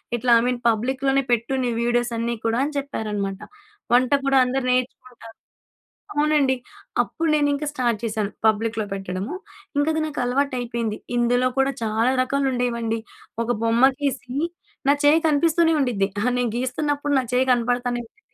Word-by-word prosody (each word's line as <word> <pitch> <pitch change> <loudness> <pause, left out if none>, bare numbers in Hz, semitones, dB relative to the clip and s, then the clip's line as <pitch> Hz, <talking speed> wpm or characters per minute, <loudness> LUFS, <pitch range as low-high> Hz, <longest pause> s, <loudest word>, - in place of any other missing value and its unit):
ఇట్లా 240 +1 0
I - - +1
mean 250 -1 0
పబ్లిక్‌లోనే 265 +4 +1
పెట్టు 235 +3 +1
నీ 245 - 0
వీడియోసన్నీ 235 -1 0
కూడా" 225 0 +1
అని 300 - -4
చెప్పారన్నమాట. 210 -8 -3 0.5
వంట 255 +2 +4
కూడా 275 -1 +3
అందరూ 255 +1 -1
నేర్చుకుంటారు. 250 -2 -4 0.8
అవునండి. 295 -3 +3 0.5
అప్పుడు 325 -1 -3
నేనింక 290 0 +1
స్టార్ట్ 245 -6 0
చేశాను. 215 -2 -2
పబ్లిక్‌లో 220 0 +1
పెట్టడము. 195 - -4 0.4
ఇంకా 290 +2 +2
అది 315 - 0
నాకు 300 -1 -5
అలవాటైపోయింది. 245 -4 -1 0.2
ఇందులో 245 +1 +2
కూడా 270 +1 +3
చాలా 225 +3 +1
రకాలుండేవండి. 245 -4 0 0.4
ఒక - - -7 0.2
బొమ్మ 230 +3 +5
గీసి 270 -2 -2 0.5
నా 280 - +7
చెయ్యి 305 +3 +6
కనిపిస్తూనే 325 +2 +3
ఉండిద్ది. 230 -8 +1
అహా! 245 +4 +1
నేను 245 -2 0
గీస్తున్నప్పుడు 290 +3 -1
నా 260 - -1
చెయ్యి 255 +1 +3
కనపడతానే 245 0 0
ఉండిద్ది. 230 - -25
245 Hz, 140 wpm, -23 LUFS, 230-275 Hz, 0.8 s, నా